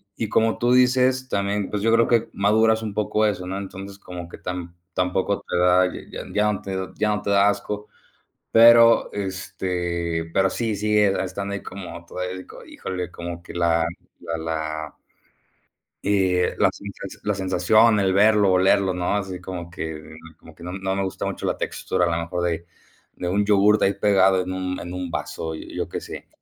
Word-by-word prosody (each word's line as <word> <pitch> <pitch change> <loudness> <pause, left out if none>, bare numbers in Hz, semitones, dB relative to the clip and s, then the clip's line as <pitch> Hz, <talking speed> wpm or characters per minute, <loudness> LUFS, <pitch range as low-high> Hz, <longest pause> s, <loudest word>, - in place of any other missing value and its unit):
y 110 -2 -3
como 115 0 +2
tú 120 +1 +2
dices, 130 +1 +3
también, 100 0 -1
pues, 105 -1 -2
yo 115 - +3
creo 115 0 +4
que 115 -1 +2
maduras 110 +2 +3
un 105 -2 -4
poco 105 0 +1
eso, 90 -3 -2
¿no?, 95 +1 -3
entonces, 100 0 -8
como 90 -1 -8
que - - -10
tam 90 -1 -6 0.2
tampoco 90 +2 0
te - - -1
da, 90 +1 +4 0.2
ya - - -6
ya 105 0 +2
no - - -5
te 95 -1 -5 0.2
ya 105 0 +1
no - - -4
te - - -3
da 100 0 +5
asco, 105 +1 -4 0.7
pero, 115 0 +7
este, 90 -3 -3
pero 95 0 +3
sí, 110 -3 -2
sigue 105 0 +3
estando 100 +2 -4
ahí 100 - -5
como 90 -3 -8
todavía, 90 +1 -5 0.2
híjole, 90 -1 -5
como 85 0 -7
que - - -11
la 85 -1 +2 0.4
la 85 -1 -4
la 80 -1 -4 1.1
eh, 95 -3 +2
la - - +4
sensa - - -9
la 105 - 0
sensación, 100 +4 +3
el 95 -1 +2
verlo, 105 -1 +5
olerlo, 95 +1 +3
¿no?, 90 +2 -1
así 95 -3 -3
como 90 -2 -6
que 80 -3 -6 0.4
como - - -16
que 85 - -14
no 90 +1 -6
no 95 0 -2
me 100 - -1
gusta 95 - -4
mucho - - -4
la - - -1
textura, 90 -1 -1
a 85 - 0
lo 85 - -2
mejor 85 +1 -3
de 85 -1 -1 0.5
de 90 - -3
un 100 +2 +1
yogur 105 0 +5
de - - +4
ahí 100 - +1
pegado 95 -3 +3
en 90 +1 -4
un 90 0 -3
en 90 +1 -7
un 90 -1 -4
vaso, 80 -1 -4
yo - - -5
qué - - -4
sé. - - -9
95 Hz, 190 wpm, -23 LUFS, 90-105 Hz, 1.1 s, pero